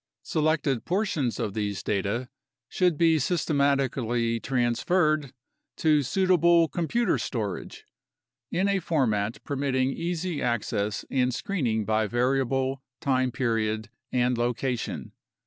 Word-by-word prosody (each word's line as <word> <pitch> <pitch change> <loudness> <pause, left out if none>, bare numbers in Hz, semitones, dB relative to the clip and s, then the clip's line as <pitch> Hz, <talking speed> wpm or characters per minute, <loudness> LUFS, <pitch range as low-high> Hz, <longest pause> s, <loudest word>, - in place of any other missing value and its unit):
Selected 150 -5 0
portions 185 - -1
of 110 -4 -2
these 100 -4 -2
data 105 +5 -1 0.4
should 180 0 +1
be 165 -1 +4
systematically 135 -7 +1
transferred 140 +5 +1 0.5
to 155 -2 +3
suitable 170 +2 +4
computer 185 +7 0
storage, 105 -7 -4 0.6
in 190 +3 +1
a 200 -1 +2
format 115 - 0
permitting 135 -2 0
easy 170 0 -3
access 105 -3 -1
and 130 -1 +2
screening 125 - -1
by 110 0 +1
variable, 130 +3 0 0.2
time 130 -2 +1
period, 110 -4 -1 0.2
and 125 -1 +1
location. 120 +1 -2
130 Hz, 105 wpm, -27 LUFS, 115-160 Hz, 0.6 s, be